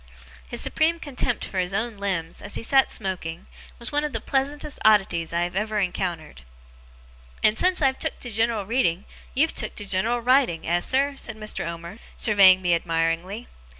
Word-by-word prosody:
His - - -4
supreme 330 +2 +1
contempt 260 -5 -2
for 190 - -4
his 180 +1 -2
own 220 +1 -2
limbs, 180 -5 -3
as 205 - -4
he - - -3
sat 270 +3 +4
smoking, 180 -4 -4 0.3
was 235 +3 -4
one 295 0 +1
of 300 -3 -3
the 225 - -1
pleasantest 285 +4 -2
oddities 195 -6 +3
I 170 0 0
have 175 +1 -4
ever 215 +2 -1
encountered. 175 - -3 1.0
'And 215 - +4
since 360 +4 +2
I've 265 -1 +2
took - - -2
to 245 - -4
general 225 -1 0
reading, 200 -5 0 0.3
you've 315 +5 +2
took - - -1
to 205 - -3
general 215 +6 +1
writing, 245 -8 +2
eh, 175 +1 +1
sir?' 275 +9 +1
said 220 - -3
Mr. 215 -5 -2
Omer, 170 +5 -7 0.2
surveying 190 -4 +6
me 175 -1 +3
admiringly. 165 +6 -1
210 Hz, 180 wpm, -24 LUFS, 175-250 Hz, 1.0 s, surveying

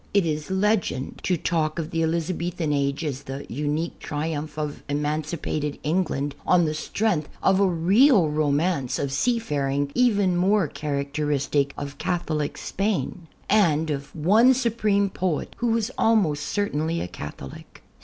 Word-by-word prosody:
It 200 -3 +4
is 155 0 -2
legend 190 -8 0
to 180 - +2
talk 155 -1 -1
of 165 0 -3
the 165 - 0
Elizabethan 165 0 -1
age 140 +2 0
as 140 -3 -3
the 135 +1 -7
unique 150 +5 -2
triumph 150 0 -4
of 150 -1 -4
emancipated 150 0 -2
England, 150 -4 0
on 175 -2 +4
the 155 - -1
strength 160 0 -1
of 190 0 +4
a^ 175 -4 +1
real 210 - +6
romance 150 -1 0
of 140 -1 -2
sea 235 - +1
faring 140 -8 -1
even 205 -7 +3
more 190 0 +3
characteristic 140 0 -1
of 140 0 -6
Catholic 155 -4 -2
Spain, 185 -4 -2 0.2
and 160 -7 +3
of 140 0 -5
one 215 - +5
supreme 215 -5 +1
poet 185 -4 -2
who 240 - 0
was 230 +1 +1
al 225 +1 +4
most 150 -8 +1
certainly 165 -5 -1
a - - -3
Catholic. 75 -4 -9
160 Hz, 145 wpm, -24 LUFS, 145-190 Hz, 0.2 s, real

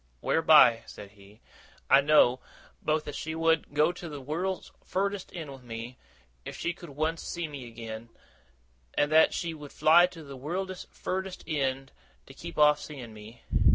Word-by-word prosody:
'Whereby,' 150 -8 +6
said 100 -1 -10
he, 100 +1 -19 0.5
'I 135 - +7
know, 140 -4 +5 0.4
both 155 0 0
as 145 - -5
she 160 +2 -4
would 165 -2 +1
go 155 +3 +4
to 175 -1 -8
the 145 -2 -7
wureld's 170 +8 -3
furdest 195 0 -2
end 160 -5 -6
with 135 -1 -11
me, 120 +1 -8 0.4
if - - -8
she 175 - -2
could 175 -2 -12
once 155 +3 -2
see 170 -2 -4
me 140 -5 -8
again; 115 0 -8 0.9
and 145 +1 +2
that 160 +1 +6
she 170 -2 -3
would 150 -2 -10
fly 170 +3 +6
to 170 -3 -12
the 140 -2 -9
wureld's 180 +7 -4
furdest 190 0 -4
end 135 -3 -2 0.3
to 135 - -13
keep 170 +4 -9
off 150 -1 +5
seeing 125 -7 -9
me. 110 +2 -13
150 Hz, 170 wpm, -28 LUFS, 130-165 Hz, 0.9 s, I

